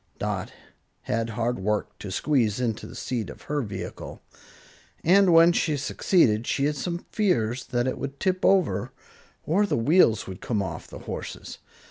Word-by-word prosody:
Dot - - -3 0.5
had 115 +1 -1
hard 120 +2 -1
work 105 +2 -2
to 100 - -7
squeeze 115 0 +1
into 115 -4 -2
the - - -11
seat 115 -6 -3
of - - -11
her 145 0 -1
vehicle, 100 -6 -7 0.8
and 190 +2 +5
when 165 +1 +7
she 155 -3 0
succeeded 125 - +2
she 140 - +1
had 150 +1 0
some 170 +4 -4
fears 125 - 0
that 120 0 -1
it 130 - -2
would 140 0 -5
tip 185 -1 0
over, 165 - +2 0.5
or 200 +6 +2
the - - 0
wheels 115 - +4
would 95 -1 -8
come 105 -4 -1
off 95 - -6
the - - -10
horses. - - -7
130 Hz, 165 wpm, -26 LUFS, 110-170 Hz, 0.8 s, when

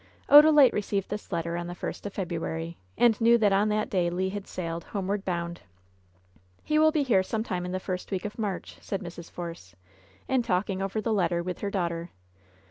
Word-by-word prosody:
Odalite 295 -2 +8
received 200 -1 -2
this 210 0 -6
letter 170 -1 -2
on 175 0 -3
the 175 - -6
first 190 - -5
of 200 - -8
February, 165 -2 -3 0.2
and 235 -2 +4
knew 235 +1 +6
that 210 -3 +3
on 205 +2 +3
that 210 0 0
day 180 -3 +1
Le 185 +2 -1
had 200 -1 -6
sailed, 170 -2 -4
homeward 200 0 -2
bound. 170 -2 -3 1.0
"He 305 0 +2
will 315 0 +6
be 305 -2 +1
here 225 -8 +3
some 220 +3 -2
time 180 -5 -3
in - - -4
the 185 - -2
first 185 -1 -5
week 190 0 -3
of 210 +2 -6
March," 200 -4 -4
said 195 -1 -4
Mrs. 170 -1 -9
Force, 165 - -8 0.5
in 260 -1 +2
talking 190 -2 -1
over 195 +3 -2
the 225 0 0
letter 170 -4 +1
with 180 -1 -4
her 200 - -2
daughter. 170 -3 -2
190 Hz, 205 wpm, -27 LUFS, 175-210 Hz, 1.0 s, Odalite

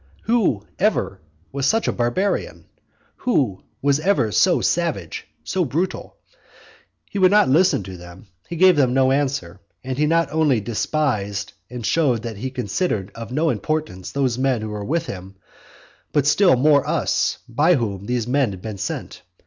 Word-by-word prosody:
Who 215 - +1 0.2
ever - - 0 0.3
was 140 0 -1
such 225 +7 +2
a - - +2
barbarian? 120 +12 -1 0.5
Who 130 - 0 0.2
was 140 0 +3
ever 155 - +1
so 180 - +3
savage? 155 - -2 0.2
so 185 - 0
brutal? 165 +6 -3 0.9
He 200 - -4
would 185 -1 +6
not 205 -8 +4
listen 155 - +3
to 95 0 -8
them; 90 +3 -13 0.2
he 170 - -4
gave 185 0 +5
them 130 -3 +3
no 130 0 +4
answer; 135 -10 -1 0.2
and 130 +1 -4
he 150 - +3
not 165 +1 +2
only 150 -6 +2
despised 105 -3 -2 0.2
and 120 -2 -6
showed 130 -8 +1
that 115 -3 -5
he 130 +6 -4
considered 125 - -2
of 115 +1 -8
no 155 +5 +1
importance 155 - -3
those 130 -3 0
men 130 -4 +1
who 110 - -4
were 105 -1 -5
with 165 +10 -1
him, 95 +1 -8 0.8
but 145 -3 +2
still 180 +2 +5
more 140 +2 +4
us, - - 0
by 150 +9 +3
whom 100 -6 -3
these 125 -2 -1
men 130 0 +1
had 95 -2 -8
been 105 -3 -6
sent. - - -5
130 Hz, 165 wpm, -21 LUFS, 110-160 Hz, 0.9 s, would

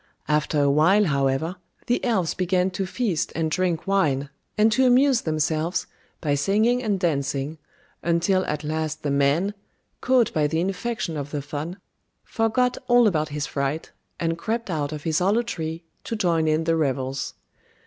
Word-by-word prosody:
After 150 0 +1
a 140 -1 +3
while, 170 +9 +4
however, 140 +3 0 0.3
the 245 0 0
elves 195 -9 +1
began 185 0 +1
to 190 +1 -3
feast 195 -6 -1
and 160 -1 -1
drink 175 -1 0
wine, 145 -8 +1 0.3
and 215 +1 +4
to 260 +3 +4
amuse 255 0 +4
themselves 155 +2 -1 0.4
by 150 -4 +1
singing 215 - +2
and 210 -5 0
dancing, 145 -2 -1 0.4
until 175 +3 +2
at 150 0 -2
last 155 0 -3
the 145 - 0
man, 140 +8 +2 0.5
caught 255 -3 +3
by 150 -2 +2
the 160 +2 -1
infection 190 -1 -2
of 145 -1 -4
the 145 -1 -4
fun, 155 +5 -5 0.5
forgot 245 +2 0
all 245 -1 +6
about 155 -7 +1
his 145 0 -3
fright, 140 +3 -3 0.3
and 165 0 -1
crept 225 -1 -2
out 150 -3 -1
of 150 -1 -6
his 160 -2 +1
hollow 205 +6 +2
tree 165 -7 -4 0.2
to 230 - -3
join 170 -6 +1
in 155 +1 +2
the 165 0 +2
revels. 135 -3 -1
165 Hz, 165 wpm, -24 LUFS, 150-200 Hz, 0.5 s, all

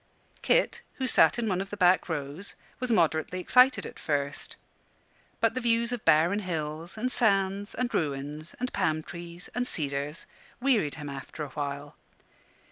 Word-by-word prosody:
Kit, - - +2
who 265 - -2
sat 250 - +5
in 235 -2 -1
one 185 -2 0
of 195 - -6
the 205 - -6
back 180 -1 +4
rows, 150 +4 -5 0.2
was 250 -1 -1
moderately 170 -2 +1
excited 250 +7 +4
at - - -9
first. 145 -2 -2 0.8
But - - +2
the 255 - -2
views 235 0 +2
of 245 -3 -4
barren 170 +7 +4
hills, 165 -1 -4
and 250 +4 -1
sands, 200 -2 +1
and 245 -1 -2
ruins, 150 +1 -3
and 250 0 -3
palm 155 -5 0
trees, 170 +1 -8
and 245 +1 -1
cedars, 145 - -1 0.3
wearied 240 - +2
him 150 -2 -7
after 140 +2 -7
a 145 - -6
while. 145 +1 -5
175 Hz, 160 wpm, -28 LUFS, 150-225 Hz, 0.8 s, sat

